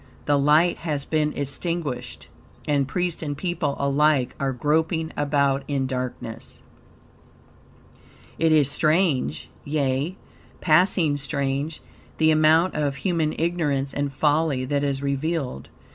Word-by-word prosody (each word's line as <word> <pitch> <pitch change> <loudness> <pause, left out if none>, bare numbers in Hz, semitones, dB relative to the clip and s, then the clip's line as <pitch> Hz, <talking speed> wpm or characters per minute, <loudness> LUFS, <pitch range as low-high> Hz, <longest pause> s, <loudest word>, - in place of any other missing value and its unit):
The 145 -1 +3
light 150 +5 +4
has 150 -4 -3
been 155 -1 0
extinguished, 140 - -4 0.4
and 140 -2 +1
priest 175 +3 -2
and 145 -3 -4
people 165 -4 -2
alike 140 -1 +2
are 135 -1 0
groping 160 +5 0
about 140 -1 +1
in 140 -2 -1
darkness. 125 -3 -5 1.8
It 165 0 +3
is 150 -3 +4
strange, 155 - +1 0.2
yea, 145 +4 -1 0.4
passing 160 -2 +3
strange, 140 +2 -2 0.4
the 160 0 +4
amount 155 +3 +4
of 145 -2 -1
human 165 -3 -1
ignorance 150 -5 -1
and 140 0 -2
folly 145 -1 +1
that 140 +2 -1
is 140 -1 -1
revealed. 140 - -2
145 Hz, 115 wpm, -24 LUFS, 140-160 Hz, 1.8 s, light